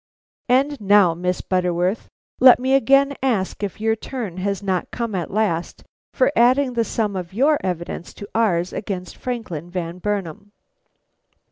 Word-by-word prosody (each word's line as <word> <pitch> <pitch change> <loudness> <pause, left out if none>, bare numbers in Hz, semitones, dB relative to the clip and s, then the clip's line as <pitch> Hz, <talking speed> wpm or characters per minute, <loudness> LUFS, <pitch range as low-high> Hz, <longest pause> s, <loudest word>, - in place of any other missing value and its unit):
"And 270 +1 +2
now, 200 -3 +5
Miss 180 +2 -2
Butterworth, 180 +2 -1 0.3
let 255 -1 +8
me 260 +1 0
again 275 +2 +4
ask 225 -9 -1
if 205 0 -4
your 220 +1 +1
turn 220 -5 -6
has 200 +1 -2
not 190 -2 -1
come 235 -3 -4
at 180 -3 -3
last 195 -5 -1 0.3
for 260 +1 +3
adding 255 +3 +3
the 235 -1 +1
sum 215 -3 -2
of 180 -1 -5
your 290 +5 +3
evidence 175 -1 -4
to 205 - -9
ours 185 -6 +1
against 190 -3 -5
Franklin 195 - -5
Van 175 -1 -5
Burnam?" 205 0 -4
205 Hz, 150 wpm, -21 LUFS, 180-245 Hz, 0.3 s, let